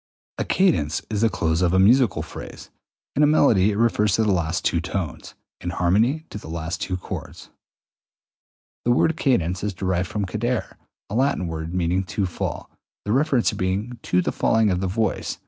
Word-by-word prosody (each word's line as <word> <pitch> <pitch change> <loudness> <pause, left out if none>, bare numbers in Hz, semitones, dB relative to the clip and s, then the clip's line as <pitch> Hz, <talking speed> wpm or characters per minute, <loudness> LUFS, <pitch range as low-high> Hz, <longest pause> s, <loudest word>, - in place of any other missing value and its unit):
202. - - +1
A - - -1
cadence 145 - +2
is 105 -1 -1
the 115 - +4
close 80 -3 0
of 90 -1 +2
a 95 - +4
musical 105 - +4
phrase: 85 - -10 0.4
in 150 +1 +4
melody 110 -10 +4
it 100 - -1
refers 105 -3 +2
to 110 - +2
the 105 - +2
last 85 -1 -1
two 85 - +1
tones; 90 -2 -5 0.2
in 90 - -4
harmony 110 - +1
to 105 - -6
the - - -11
last 80 0 -4
two 90 - -2
chords. - - -8 1.3
The - - 0
word 155 +6 +3
cadence 100 - 0
is 105 -2 -2
derived 90 0 -1
from 105 +1 -2
cadere, 110 +5 -2 0.3
a - - -8
Latin 130 -5 +1
word 80 +1 -5
meaning 90 +1 +1
to 95 +3 -1
fall, 90 - -4 0.3
the 105 - -1
reference 135 -1 +2
being 100 +6 -2
to 90 0 +1
the - - -1
falling 110 -2 +2
of 90 0 -1
the 95 - 0
voice 110 +4 -1
(_i.e. - - -29
95 Hz, 190 wpm, -23 LUFS, 90-115 Hz, 1.3 s, the